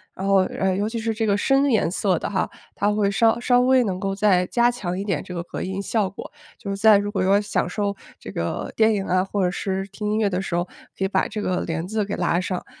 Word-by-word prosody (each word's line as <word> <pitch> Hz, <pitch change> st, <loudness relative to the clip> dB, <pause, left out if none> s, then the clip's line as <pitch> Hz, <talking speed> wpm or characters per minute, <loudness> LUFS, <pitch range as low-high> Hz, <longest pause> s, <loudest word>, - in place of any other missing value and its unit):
然 190 Hz, -, -5 dB
后， 195 Hz, 0 st, +5 dB
呃， 190 Hz, 0 st, -1 dB
尤 205 Hz, +3 st, -1 dB
其 230 Hz, -, -4 dB
是 225 Hz, 0 st, -1 dB
这 220 Hz, 0 st, -1 dB
个 200 Hz, 0 st, +2 dB
深 270 Hz, +5 st, +3 dB
颜 220 Hz, -9 st, +2 dB
色 190 Hz, -1 st, +1 dB
的 -, -, -3 dB
哈， 200 Hz, -, -1 dB, 0.2 s
它 205 Hz, +1 st, +1 dB
会 205 Hz, -1 st, +1 dB
稍 225 Hz, +3 st, +3 dB
稍 245 Hz, +1 st, +3 dB
微 255 Hz, 0 st, +4 dB
能 190 Hz, -5 st, -2 dB
够 195 Hz, 0 st, -2 dB
再 190 Hz, -3 st, +3 dB
加 240 Hz, +3 st, +3 dB
强 185 Hz, -7 st, -4 dB
一 -, -, -2 dB
点 190 Hz, -8 st, -1 dB
这 -, -, -11 dB
个 175 Hz, -1 st, -4 dB
隔 -, -, -6 dB
音 190 Hz, +1 st, -3 dB
效 200 Hz, 0 st, 0 dB
果。 200 Hz, -, -9 dB, 0.3 s
就 200 Hz, -4 st, -6 dB
是 195 Hz, -, -3 dB
在 215 Hz, 0 st, +6 dB
如 205 Hz, +1 st, -2 dB
果 195 Hz, -3 st, -1 dB
要 195 Hz, +2 st, +4 dB
享 205 Hz, -3 st, -1 dB
受 200 Hz, +1 st, -2 dB, 0.2 s
这 -, -, -9 dB
个 -, -, -3 dB
电 220 Hz, -1 st, +4 dB
影 195 Hz, -1 st, -2 dB
啊， 185 Hz, 0 st, +2 dB
或 195 Hz, 0 st, -2 dB
者 180 Hz, -, +1 dB
是 195 Hz, 0 st, -2 dB
听 210 Hz, +1 st, -4 dB
音 215 Hz, -, +1 dB
乐 220 Hz, -2 st, +2 dB
的 185 Hz, -1 st, -1 dB
时 185 Hz, -3 st, -3 dB
候， 175 Hz, -, +1 dB, 0.3 s
可 190 Hz, -, 0 dB
以 -, -, +2 dB
把 190 Hz, -, +1 dB
这 215 Hz, -, -5 dB
个 185 Hz, -3 st, -1 dB
帘 165 Hz, 0 st, -3 dB
子 215 Hz, +1 st, -1 dB
给 205 Hz, -, -3 dB
拉 175 Hz, 0 st, +1 dB
上。 185 Hz, -1 st, -4 dB
200 Hz, 295 characters per minute, -23 LUFS, 185-215 Hz, 0.3 s, 在